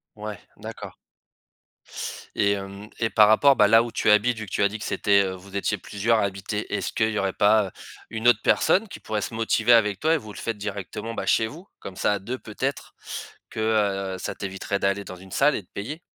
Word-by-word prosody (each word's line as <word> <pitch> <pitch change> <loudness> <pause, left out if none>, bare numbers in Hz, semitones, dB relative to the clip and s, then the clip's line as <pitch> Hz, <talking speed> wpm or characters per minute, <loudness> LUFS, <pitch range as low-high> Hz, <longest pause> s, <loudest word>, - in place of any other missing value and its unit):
Ouais, 105 -2 -6 0.2
d'accord. - - -8 1.4
Et 100 - +3
hem 100 +1 -7
et 115 - +1
par 105 0 +6
rapport, 135 +6 +5
bah, 105 - +6
là 115 +2 +6
où 120 - -6
tu - - +1
habites, 110 +3 +4
vu 110 - -5
que 95 - -14
tu - - +1
as 100 - +4
dit 110 +2 -6
que 105 - -6
c'était, 100 -1 +3
heu, 95 - -2
vous 95 +2 -8
étiez 105 +1 0
plusieurs 110 +4 0
à - - +2
habiter, 100 +2 -4
est-ce - - -2
qu'il 110 -1 +1
y 110 - -1
aurait 95 -1 -1
pas 105 -1 +3 0.4
une 110 +1 -1
autre 120 - +4
personne 200 - +3
qui - - -10
pourrait 105 -1 -2
se 115 - -4
motiver 115 +1 +3
avec 105 -4 +3
toi 160 +1 +2
et - - +3
vous 110 -7 -9
le - - -11
faites 115 -2 -3
directement, 105 +2 -5
bah, - - -4
chez 110 - +3
vous? 165 - -11
Comme 95 -1 -9
ça, - - +2
à 100 - -2
2 120 +7 -5
peut-être 110 - -4 0.5
que, - - -7 0.6
heu, - - -7
ça - - -4
t'éviterait 100 +1 -3
d'aller 100 +1 0
dans 95 - -8
une 95 +1 -14
salle 150 - +3
et - - -3
de - - -31
payer. 135 +11 -5
105 Hz, 235 wpm, -25 LUFS, 100-115 Hz, 1.4 s, par